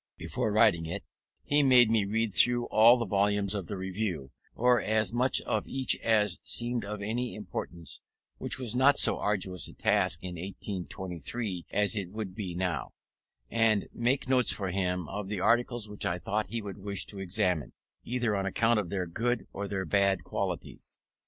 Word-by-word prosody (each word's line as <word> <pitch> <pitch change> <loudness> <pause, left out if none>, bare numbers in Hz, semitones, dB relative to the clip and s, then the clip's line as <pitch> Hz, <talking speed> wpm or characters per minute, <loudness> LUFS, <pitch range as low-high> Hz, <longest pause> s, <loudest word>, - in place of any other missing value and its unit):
Before 110 - -2
writing 105 -7 +3
it 85 - -4 0.4
he 145 +1 +3
made 125 -4 +6
me 110 -3 +2
read 110 +1 -1
through 120 +2 +3
all 115 +3 +7
the 120 - -2
volumes 100 0 +2
of 100 -5 -4
the 100 - -5
Review, 95 -7 -4 0.2
or 125 -1 +3
as 110 0 +1
much 125 +2 +2
of - - -1
each 130 -1 +2
as 110 -2 +2
seemed 120 -1 -1
of 105 0 -5
any 120 +4 -2
importance 90 -4 -6 0.4
(which 120 - -1
was 125 -3 -3
not 140 +3 +5
so - - +6
arduous 95 -3 -1
a - - -12
task - - +1
in 90 -1 -5
1823 95 - -5
as 105 +1 +1
it 100 -4 -3
would 105 -1 -6
be 95 -4 -5
now), 90 -6 -2 0.6
and 115 -3 +2
make 125 +3 0
notes 125 -2 +3
for 95 -2 -3
him 90 -3 -1
of 100 +2 -5
the 100 -1 -3
articles 120 +1 +1
which 105 0 -7
I 85 - 0
thought 105 +4 -2
he 115 +3 -4
would 100 0 -7
wish 100 -1 -1
to 100 - -6
examine, 90 -4 -1 0.3
either 120 -3 -1
on 95 -1 -1
account 115 +3 +2
of 95 -5 -4
their 95 -1 -2
good 115 +7 -2
or 100 +1 -4
their 95 -1 -3
bad 100 +1 +2
qualities. - - -5
105 Hz, 180 wpm, -29 LUFS, 95-115 Hz, 0.6 s, all